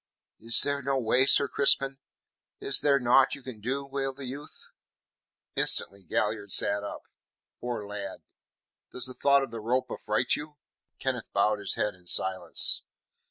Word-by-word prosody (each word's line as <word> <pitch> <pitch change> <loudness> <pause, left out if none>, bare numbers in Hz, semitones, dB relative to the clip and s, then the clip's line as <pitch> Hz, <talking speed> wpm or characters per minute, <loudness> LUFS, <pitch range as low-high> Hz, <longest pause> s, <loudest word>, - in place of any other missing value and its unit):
"Is 115 +1 +4
there 140 0 -1
no 135 0 0
way, 130 +2 +3
Sir 140 - +5
Crispin? 135 0 +2 0.6
Is 135 - +2
there 140 -1 +4
naught 125 +2 +4
you 140 - -13
can 125 -4 -8
do?" 135 +5 -2
wailed 135 -1 -3
the 140 - -6
youth. 140 +4 -8 0.9
Instantly 100 0 0
Galliard 105 +3 -2
sat 100 +2 +1
up. 100 - -7 0.6
"Poor 120 -4 -4
lad, 100 -1 -7 0.7
does 125 - -4
the 130 - -7
thought 140 +1 +3
of 135 - -6
the 115 - -6
rope 125 +4 -1
affright 105 0 0
you?" 150 0 -7 0.4
Kenneth - - -3
bowed 105 0 +2
his 100 - -1
head 105 - -1
in 90 -1 -20
silence. 95 +2 +1
125 Hz, 160 wpm, -28 LUFS, 105-135 Hz, 0.9 s, Sir